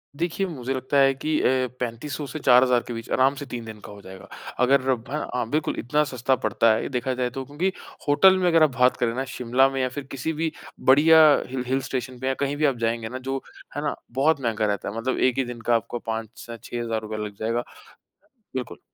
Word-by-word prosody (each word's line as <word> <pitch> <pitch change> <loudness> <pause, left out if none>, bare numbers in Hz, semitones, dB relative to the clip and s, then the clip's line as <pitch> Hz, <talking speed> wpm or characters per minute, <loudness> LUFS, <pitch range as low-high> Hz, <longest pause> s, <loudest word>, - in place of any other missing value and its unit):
देखिए, 170 +5 -1
मुझे 135 -6 -4
लगता 130 +2 -1
है 135 0 +5
कि 150 +3 -1
अ, 130 0 +2
3500 125 +5 -4
से 155 - -6
4000 125 -2 +5
के 120 - -4
बीच 115 0 -7
आराम 135 +2 +3
से 145 - -7
3 120 -3 -6
दिन 110 -1 -9
का - - -9
हो 100 0 -11
जाएगा। 95 -1 -12 0.4
अगर 135 +1 +4
हैं, 130 - +4 0.4
हाँ, 120 -2 -2
बिल्कुल 155 +3 -1
इतना 150 +6 +1
सस्ता 130 -2 0
पड़ता 110 +1 +3
है 110 - 0
ये, - - -4
देखा 130 0 -1
जाए 125 -1 -1
तो 135 +2 -6
क्योंकि 155 +8 -1 0.4
होटल 185 +7 +6
में 180 - +1
अगर 165 -2 +5
आप 155 - +5
बात 125 0 +4
करें 115 -2 0
ना, 130 - -1
शिमला 125 +1 +2
में 135 -1 -2
या 130 - 0
फिर 140 +3 -6
किसी 135 +4 -3
भी 160 +1 -1 0.3
बढ़िया 155 +4 +6 0.2
हिल 125 0 -4
हिल 135 +1 +1
स्टेशन 130 -1 -4
पे 130 - -3
या 135 - +2
कहीं 140 +1 -1
भी 155 - +2
आप 135 -4 +1
जाएँगे 115 -1 -2
ना 130 - -5
जो 135 0 -2 0.3
है 145 - -2
ना, 145 - -1 0.2
बहुत 140 +3 +2
महँगा 115 -3 0
रहता 105 -1 -2
है। 100 - -7
मतलब 125 +3 -1
एक 130 -1 +2
ही 135 - +1
दिन 120 -1 -7
का 120 +1 +2
आपको 115 +1 -2
5 110 -1 -4 0.2
से 115 0 -8
6000 115 -2 -3
रुपए 110 0 -6
लग 105 -1 -8
जाएगा। 115 +2 -1 0.9
बिल्कुल। 125 -2 -5
130 Hz, 240 wpm, -24 LUFS, 115-140 Hz, 0.9 s, होटल